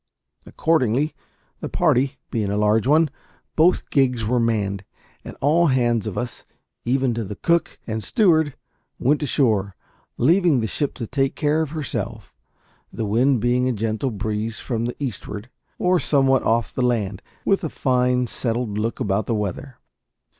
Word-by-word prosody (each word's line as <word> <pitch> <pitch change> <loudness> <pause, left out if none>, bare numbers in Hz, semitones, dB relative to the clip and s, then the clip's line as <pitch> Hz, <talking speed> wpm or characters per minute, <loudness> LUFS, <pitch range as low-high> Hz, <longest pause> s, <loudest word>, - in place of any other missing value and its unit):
Accordingly, 150 -2 +1 0.5
the - - -5
party 135 +2 +1
being 105 -4 -1
a 100 - -1
large 105 +2 +2
one, 155 +1 +4 0.4
both 170 +3 +3
gigs 125 -5 +2
were 125 +3 +1
manned, 100 -4 0 0.4
and - - -9
all 165 +5 +4
hands 120 -5 +1
of 105 - -5
us, 120 -1 -4 0.4
even 130 0 +1
to 115 0 -2
the 105 0 -6
cook 170 +8 0
and 110 -1 -4
steward, 160 - +2 0.4
went 145 +4 +1
ashore, 110 -9 +1 0.4
leaving 165 +1 +4
the 110 - -1
ship 140 +6 -2
to 120 - -4
take 135 +3 -1
care 150 +1 +1
of 160 - -2
herself; 120 -8 -5 0.6
the 115 - -3
wind 120 +4 +2
being 125 +2 +2
a - - 0
gentle 110 +4 -1
breeze 110 +1 -3
from 115 -3 -2
the 120 - -3
eastward, 115 -3 -5 0.3
or 180 0 +2
somewhat 135 -3 +3
off 115 0 0
the - - -2
land, 110 -5 0 0.2
with 195 -1 +2
a 160 - -1
fine, 125 -2 +1
settled 115 -2 -2
look 115 +2 -2
about 105 -3 0
the 115 - 0
weather. 105 +5 -4
125 Hz, 160 wpm, -22 LUFS, 110-140 Hz, 0.6 s, one